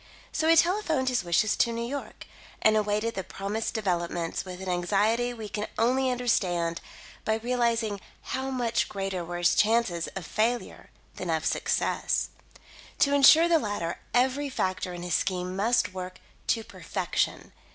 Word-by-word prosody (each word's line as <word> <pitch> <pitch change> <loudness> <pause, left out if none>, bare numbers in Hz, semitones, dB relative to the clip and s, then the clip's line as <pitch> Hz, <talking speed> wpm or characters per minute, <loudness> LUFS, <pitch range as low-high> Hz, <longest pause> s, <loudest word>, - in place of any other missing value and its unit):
So 315 - 0
he 330 - +6
telephoned 330 -7 +2
his 250 -5 0
wishes 175 +5 +2
to 235 - +3
New 230 0 -3
York, 280 +3 -6 0.4
and 215 0 +5
awaited 210 +2 0
the 190 - -3
promised 205 +6 -4
developments 175 -5 -1
with 185 -1 -8
an 190 - -7
anxiety 205 +7 +1
we 225 -3 -7
can 210 +1 -3
only 260 +3 +2
understand 180 -9 0 0.4
by 220 - +1
realising 230 -3 0 0.3
how 265 0 -2
much 245 -3 0
greater 195 -3 -3
were 175 +1 -5
his 175 0 +3
chances 215 -6 +2
of 190 -3 -5
failure 235 +6 -1 0.3
than 180 - -4
of 160 -1 0
success. - - 0 0.7
To 280 - +3
ensure 295 +4 +7
the 335 -1 +4
latter, 205 - -3
every 265 +3 +2
factor 185 -7 -2
in 175 0 -7
his 175 -1 -3
scheme 180 0 -1
must 210 0 +2
work 185 0 -6 0.3
to 225 - +1
perfection. - - -2
215 Hz, 155 wpm, -27 LUFS, 185-245 Hz, 0.7 s, ensure